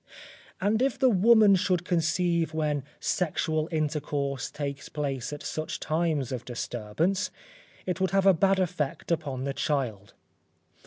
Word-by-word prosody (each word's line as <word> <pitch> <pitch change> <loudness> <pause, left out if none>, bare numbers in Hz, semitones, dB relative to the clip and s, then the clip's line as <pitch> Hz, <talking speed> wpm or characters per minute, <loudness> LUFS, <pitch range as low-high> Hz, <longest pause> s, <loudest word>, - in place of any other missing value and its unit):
And 210 +4 +1
if 270 0 +1
the 260 -1 +4
woman 215 +1 +6
should 180 -1 +1
conceive 170 -1 +1
when 150 -3 0 0.2
sexual 160 -2 0
intercourse 145 -3 -1
takes 140 -1 -5
place 140 -4 -3
at 150 - -7
such 155 0 -4
times 155 -5 0
of 125 -2 -4
disturbance, 125 - -2 0.6
it 180 0 -2
would 190 - +2
have 195 0 +2
a 195 - +7
bad 195 +3 +3
effect 160 -5 -2
upon 145 -6 -1
the 140 0 -2
child. 115 -10 -2
155 Hz, 140 wpm, -28 LUFS, 140-185 Hz, 0.6 s, a